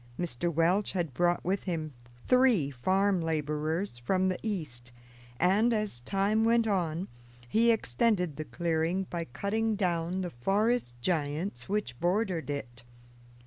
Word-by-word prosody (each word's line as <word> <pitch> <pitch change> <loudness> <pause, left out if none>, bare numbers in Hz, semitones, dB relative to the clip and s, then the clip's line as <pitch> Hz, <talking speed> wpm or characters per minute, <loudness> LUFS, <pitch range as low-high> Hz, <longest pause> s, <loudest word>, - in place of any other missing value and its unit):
Mr. 170 -1 -2
Welch 170 +6 +2
had 170 -7 -2
brought 175 +5 +1
with 190 +2 -1
him 160 -5 -3 0.3
three 250 - +4
farm 190 +8 +1
laborers 155 0 -2
from 185 +9 +1
the 185 - -2
East, 150 - -4 0.5
and, 210 +6 +3
as 210 - -2
time 200 - +1
went 230 0 +4
on, 180 -3 -1 0.4
he 230 - +3
extended 180 - +1
the 155 - -5
clearing 170 +3 0
by 170 -1 -2
cutting 215 - -1
down 180 -2 0
the 180 -2 -4
forest 195 - 0
giants 155 -2 -1
which 195 - -2
bordered 180 -2 0
it. 120 -5 -5
175 Hz, 135 wpm, -30 LUFS, 155-200 Hz, 0.5 s, three